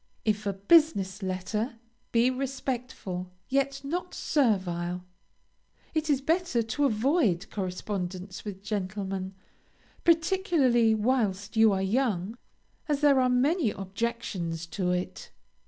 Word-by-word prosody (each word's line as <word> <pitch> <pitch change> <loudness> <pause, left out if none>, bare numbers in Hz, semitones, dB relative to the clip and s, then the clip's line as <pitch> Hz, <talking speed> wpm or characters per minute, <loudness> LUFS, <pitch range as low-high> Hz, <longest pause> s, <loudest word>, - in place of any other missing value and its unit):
If 215 -1 0
a 200 - 0
business 200 - +3
letter, 195 +6 -2 0.4
be 240 +2 +4
respectful, 250 -8 -4 0.2
yet 275 +1 0
not 355 +6 -3
servile. 180 - 0 0.9
It 315 -1 -1
is 280 -2 +3
better 325 -5 +1
to 255 +6 0
avoid 220 - +1
correspondence 185 -1 -4
with 200 -2 -7
gentlemen, 195 -2 -3 0.7
particularly 325 - +3
whilst 210 -3 0
you 220 -1 +6
are 190 -1 0
young, 210 -2 0 0.5
as 290 -1 +1
there 285 -2 +5
are 255 - +3
many 270 - +2
objections 195 -5 -3
to 180 +2 -1
it. 180 0 -3
220 Hz, 110 wpm, -28 LUFS, 190-270 Hz, 0.9 s, you